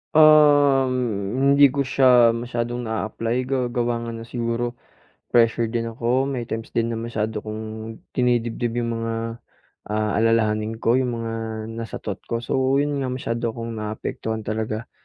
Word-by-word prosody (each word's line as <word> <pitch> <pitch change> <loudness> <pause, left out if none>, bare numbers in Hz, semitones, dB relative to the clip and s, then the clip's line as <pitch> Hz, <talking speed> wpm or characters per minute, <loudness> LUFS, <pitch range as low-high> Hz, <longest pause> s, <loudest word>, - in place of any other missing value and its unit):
Um, 145 -4 +6 0.6
hindi 140 -2 +7
ko 140 -1 -1
siya 125 -4 +5
masyadong 120 0 -3
naa-apply 115 +2 -2
ga 135 0 0
gawa 120 -1 -1
nga 115 - -5
ng 115 0 -8
siguro, 120 0 -2 0.6
pressure 115 -1 +3
din 115 0 -1
ako. 120 +3 0
May 135 -3 -2
times 115 0 -5
din 115 0 +1
na 115 - -2
masyado 110 -1 -3
kong 110 +1 -6 0.5
dinidibdib 120 -1 0
yung 120 -1 -1
mga, 115 0 -3 0.5
ah, 105 0 -1
alalahanin 110 -1 +1
ko, 120 +3 +3
yung 125 -2 0
mga 115 0 -3 0.5
nasa 115 - -6
thought 105 - -4
ko. 115 0 -2
So, 125 - -1 0.2
yun 145 -1 -1
nga 135 - -1
masyado 120 -2 -2
akong 115 -1 -5
naapektuhan 110 +1 -4
talaga. 110 +1 -3
115 Hz, 150 wpm, -23 LUFS, 115-125 Hz, 0.6 s, hindi